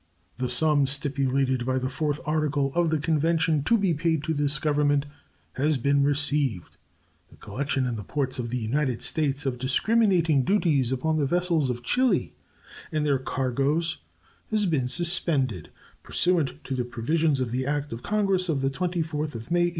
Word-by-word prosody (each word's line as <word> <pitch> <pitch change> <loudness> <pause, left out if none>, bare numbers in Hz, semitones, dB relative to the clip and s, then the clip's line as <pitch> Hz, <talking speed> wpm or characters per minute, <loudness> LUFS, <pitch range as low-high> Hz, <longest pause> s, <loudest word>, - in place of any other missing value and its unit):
The 125 -1 -1
sum 145 +2 +3
stipulated 135 -2 0
by 130 +1 0
the 130 0 -1
fourth 145 +3 -2
article 150 -3 0
of 170 -1 +2
the 160 - +1
convention 160 0 +1
to 230 - +4
be 195 -5 +1
paid 160 -1 0
to 160 - -1
this 145 0 +1
Government 145 -1 +1 0.5
has 145 +2 +1
been 140 +3 +2
received. 145 - 0 0.5
The - - -18
collection 135 -1 -2
in 120 -2 -2
the 105 - -6
ports 130 +4 -2
of 120 -1 -3
the 125 - -2
United 125 +2 -1
States 145 -2 0
of 125 -2 -2
discriminating 170 - +2
duties 150 - +1
upon 155 +5 0
the 145 -3 +1
vessels 170 -3 +1
of 120 0 -4
Chili 255 0 +1 0.6
and 155 -2 -1
their 140 -3 +2
cargoes 140 +5 -1 0.5
has 215 -2 +1
been 150 -8 0
suspended, 140 - +1 0.3
pursuant 160 -5 0
to 135 - -5
the 125 - -1
provisions 140 +5 0
of 125 -3 -2
the 130 +2 -2
act 145 -2 -2
of 115 - -7
Congress 195 -4 0
of 145 -4 0
the 135 0 0
24th 160 -2 -2
of 115 +7 -8
May, 175 0 +3
1828. - - 0
145 Hz, 175 wpm, -26 LUFS, 130-160 Hz, 0.6 s, to